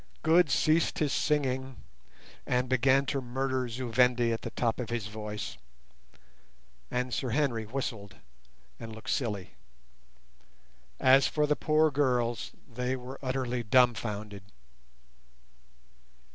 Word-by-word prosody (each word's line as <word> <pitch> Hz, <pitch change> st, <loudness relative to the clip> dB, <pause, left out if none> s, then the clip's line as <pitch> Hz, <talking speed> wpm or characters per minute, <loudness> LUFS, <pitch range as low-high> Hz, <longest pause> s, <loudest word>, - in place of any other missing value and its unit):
Good 165 Hz, 0 st, +5 dB
ceased 155 Hz, +4 st, +2 dB
his 150 Hz, -3 st, 0 dB
sighing, 130 Hz, -3 st, 0 dB, 0.7 s
and 125 Hz, 0 st, +1 dB
began 130 Hz, +2 st, +3 dB
to 135 Hz, 0 st, -1 dB
murder 130 Hz, 0 st, -2 dB
Zu 120 Hz, +1 st, -5 dB
Vendi 120 Hz, 0 st, +3 dB
at 115 Hz, -, -4 dB
the -, -, -5 dB
top 115 Hz, -1 st, -1 dB
of 125 Hz, -, -4 dB
his 120 Hz, -3 st, -2 dB
voice, 105 Hz, 0 st, -6 dB, 1.3 s
and 125 Hz, 0 st, -2 dB
Sir 130 Hz, -, -1 dB
Henry 120 Hz, -3 st, 0 dB
whistled 110 Hz, -5 st, -5 dB, 0.6 s
and 115 Hz, -1 st, -8 dB
looked 110 Hz, -, -6 dB
silly. 105 Hz, -, -2 dB, 1.5 s
As 135 Hz, +1 st, +6 dB
for 150 Hz, -1 st, +1 dB
the 150 Hz, 0 st, +2 dB
poor 155 Hz, 0 st, +2 dB
girls, 125 Hz, -4 st, 0 dB, 0.2 s
they 125 Hz, +2 st, -2 dB
were 130 Hz, +1 st, -8 dB
utterly 130 Hz, -2 st, -2 dB
dumbfounded. 110 Hz, -4 st, +1 dB
125 Hz, 115 wpm, -29 LUFS, 115-135 Hz, 1.5 s, As